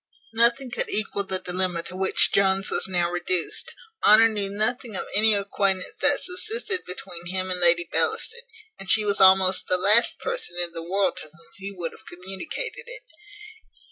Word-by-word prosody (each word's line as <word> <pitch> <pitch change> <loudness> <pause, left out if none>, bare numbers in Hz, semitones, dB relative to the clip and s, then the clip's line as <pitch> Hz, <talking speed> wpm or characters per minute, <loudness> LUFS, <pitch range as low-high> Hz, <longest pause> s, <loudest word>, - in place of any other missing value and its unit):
Nothing 235 +3 +1
could 245 - 0
equal 210 -1 +1
the 190 -1 -1
dilemma 180 -2 -2
to 185 - -5
which 190 0 +2
Jones 195 0 +2
was - - -1
now 175 -2 -1
reduced. 175 0 -2 0.3
Honour 220 +2 +6
knew 205 -3 -2
nothing 220 +2 -2
of - - -1
any 215 +1 +4
acquaintance 195 -2 -2
that 285 0 +3
subsisted 380 +2 -3
between 180 -1 -7
him 185 +1 -3
and 180 - -1
Lady 175 -1 +4
Bellaston, 475 +1 +1 0.4
and 195 - -6
she 220 -1 +5
was 200 -1 +2
almost 190 0 +4
the 185 - +1
last 210 +6 +3
person 480 - -5
in 175 -1 -2
the 165 - -7
world 190 +4 -2
to 155 - -7
whom 165 +2 -19
he 195 0 -7
would 175 -4 -6
have 220 - -18
communicated 195 - -7
it. - - -7
195 Hz, 175 wpm, -23 LUFS, 180-225 Hz, 0.4 s, Honour